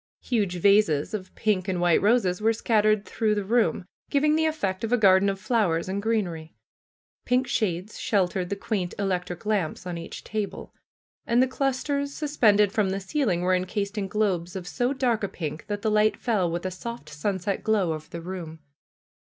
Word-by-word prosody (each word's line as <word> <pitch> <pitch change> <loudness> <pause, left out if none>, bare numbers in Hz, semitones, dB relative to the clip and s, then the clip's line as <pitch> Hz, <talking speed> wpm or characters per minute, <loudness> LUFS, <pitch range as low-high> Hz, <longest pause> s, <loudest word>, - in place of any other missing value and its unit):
Huge 205 -7 0
vases 195 -5 +3
of 190 -3 -6
pink 205 -4 0
and 185 -2 -1
white 175 -2 +3
roses 205 -4 +2
were 225 +1 +3
scattered 215 -2 +2
through 215 -2 0
the 205 - -1
room, 220 -2 +1 0.2
giving 300 +2 +3
the 320 0 +2
effect 200 -11 -2
of 225 - -2
a 245 - +4
garden 195 -2 +5
of 195 -1 -3
fiowers 195 -7 +1
and 195 +2 -2
greenery. 180 -8 -2 0.7
Pink 250 +1 +2
shades 210 -5 -2
sheltered 185 -3 0
the 200 - -1
quaint 195 -3 -3
electric 180 -2 -2
lamps 195 -5 -1
on 175 -2 -4
each 165 - -8
table. 215 -2 -5 0.5
And 235 +1 +3
the 260 - +5
clusters 280 +2 -1
suspended 215 -9 +3
from 210 -3 +1
the 190 - -1
ceil 225 +6 -1
ing 175 0 0
were 185 +1 +2
encased 200 +3 -1
in 205 -2 -2
globes 185 -4 -1
of 180 -2 -5
so 245 +7 0
dark 250 -5 0
a - - +1
pink 155 -4 -6
that 205 0 -4
the 220 - +1
light 215 0 +3
fell 205 -8 0
with 170 +2 -3
a 185 - -1
soft 235 -1 -7
sunset 190 +5 -2
glow 200 -7 +2
over 155 0 -8
the 170 - -7
room. 170 -2 -6
200 Hz, 190 wpm, -26 LUFS, 180-225 Hz, 0.7 s, garden